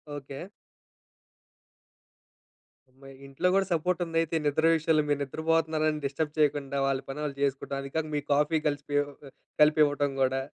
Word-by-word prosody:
Okay. 140 +1 -7 2.5
అమ్మ! 130 +2 -24 0.2
ఇంట్లో 135 +6 -1
గూడా 195 0 +3
సపోర్టుందయితే 165 -1 0
నిద్ర 155 +2 +2
విషయలో. 160 -1 +2
మీరు 145 -1 +1
నిద్రపోతున్నారని 155 +1 0
డిస్టర్బ్ 145 +2 -2
చేయకుండా 145 -2 +1
వాళ్ళ 135 -1 +1
పని 140 +2 -5
ఆళ్ళు 140 -2 -5
జేసుకుంటా. 140 0 -1
అదికాక 155 +3 -3
మీ 145 - 0
కాఫీ 150 +2 +2
కలిసిపియో 145 0 0
ఒక 140 -1 -15 0.3
కలిపివ్వటం 150 -2 +4
గూడా. 135 0 +2
150 Hz, 125 wpm, -28 LUFS, 140-160 Hz, 2.5 s, కలిపివ్వటం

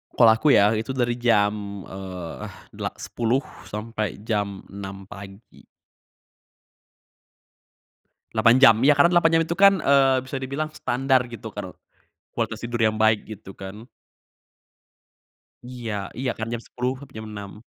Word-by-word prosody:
Kalau 115 -2 +7
aku 110 +7 +1
ya, 105 +1 +5
itu 110 +4 -2
dari 120 -1 0
jam, 105 -4 +1
eee, 95 -3 -7 0.2
dela - - -4
sepuluh 120 +4 -1 0.2
sampai 105 -1 -4
jam 105 -3 -2
6 100 -1 -8
pagi. 100 +2 -13 2.7
8 115 +1 +5
jam. 115 -5 +8
Ya, 145 +2 +7
karena 170 - +5
8 170 -1 +5
jam - - +2
itu 170 - -2
kan, 200 0 +7
eee, 135 -2 +4
bisa 130 - -7
dibilang 140 +4 -3
standar, 130 +1 +1
gitu 115 - -7
kan. - - -6 0.6
Kualitas - - -3
tidur 120 0 -3
yang 110 -1 +2
baik, 110 -1 +3
gitu 100 -3 -9
kan. 100 +5 -9 1.8
Iya, 125 -2 -6 0.3
iya 130 0 -1
kan 110 - -3
jam 120 - -4
10 125 +1 -2
sampai 135 -3 -14
jam 110 - -7
6. 105 +1 -9
115 Hz, 140 wpm, -24 LUFS, 100-130 Hz, 2.7 s, jam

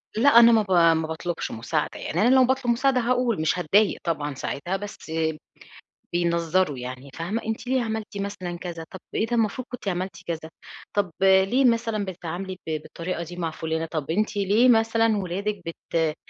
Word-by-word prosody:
لأ، 260 +6 +5
أنا 235 0 +8
ما 225 - +5
ب 200 -2 -6
ما 165 -2 +4
باطلبش 165 +2 -4
مساعد، 120 +7 -1
يعني 170 - -2
أنا 245 +4 +5
لو 260 -1 +6
باطلب 260 -1 +1
مساعدة 260 +2 +2
هاقول، 245 -5 +1
مش 160 +3 +1
هاتضايق 200 +5 +3
طبعًا 150 -4 -2
ساعتها، 175 +7 -3
بس 200 -5 -9 1.0
بينظّروا 170 -2 +1
يعني، 125 +2 -7
فاهمة؟ 185 +8 -3
أنتِ 225 +2 -4
ليه 260 -1 +2
عملتِ 220 -2 -4
مثلًا 195 -3 -4
كذا؟ 170 -2 -6
طب 190 - -8
إيه 220 - +1
ده؟ 240 - -1
المفروض 230 +3 0
كنتِ 250 -5 -7
عملتِ 185 +1 -2
كذا، 160 -1 -4 0.4
طب 200 -4 0
ليه 195 +7 +4
مثلًا 230 -3 +1
بتتعاملي 185 +1 -6
ب - - -3
بالطريقة 170 +1 -5
دي 175 +2 -9
مع 165 -2 -2
فلانة؟ 160 +1 -3
طب 155 -2 -4
أنتِ 210 +5 0
ليه 205 +6 +4
مثلًا 225 -1 +3
ولادِك 195 +2 -3
بت 165 -1 -2
190 Hz, 175 wpm, -25 LUFS, 165-225 Hz, 1.0 s, أنا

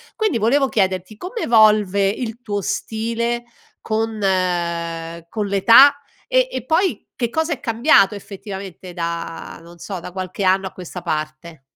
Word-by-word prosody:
Quindi 435 - 0
volevo 265 +6 +3
chiederti 190 0 -1
come 435 - -6
evolve 210 -3 +4
il 225 +3 -4
tuo 205 -4 -2
stile 230 +4 -2 0.4
con, 220 0 -2
ehm, 170 -3 -1
con 210 0 -2
l'età 230 +9 +6 0.3
e - - +3
e 255 - -4
poi 350 +7 0
che 240 -2 -1
cosa 320 +5 0
è - - -7
cambiato 230 -4 +4
effettivamente 195 -3 -8
da 170 -1 -5
non 170 +1 -15
so, 190 +1 -6
da 170 - -9
qualche 185 +1 -5
anno 190 +1 +2
a - - -8
questa 180 0 -8
parte? 155 0 -5
200 Hz, 150 wpm, -20 LUFS, 180-235 Hz, 0.4 s, l'età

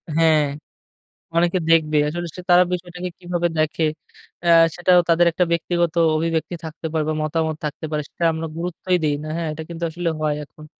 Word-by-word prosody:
হ্যাঁ, 160 -2 +4 0.9
অনেকে 175 +2 +3
দেখবে 155 -2 +4
আসলে 175 +3 -3
সে 180 - -6
তারা 180 +1 +7
বিষয়টাকে 180 0 -4
কিভাবে 175 -1 -1
দেখে 155 +1 +1 0.6
আ 170 - +1 0.3
সেটাও 180 0 +4
তাদের 170 +1 +4
একটা 180 - +2
ব্যক্তিগত 170 0 0 0.2
অভিব্যক্তি 165 +2 -1
থাকতে 160 +1 -6
পারবে 155 0 0
মতামত 160 0 -1
থাকতে 150 +1 -5
পারে, 150 -1 -1
সেটা 170 - -4
আমরা 160 0 -4
গুরুত্বই 180 +1 -1
দেই 150 - +2
না, 155 - -6
হ্যাঁ 170 -2 -2
এটা 160 +1 -6
কিন্তু 170 0 -5
আসলে 175 +1 -3
হয় 150 -1 +1
এখন। 155 +1 -15
165 Hz, 170 wpm, -21 LUFS, 155-175 Hz, 0.9 s, তারা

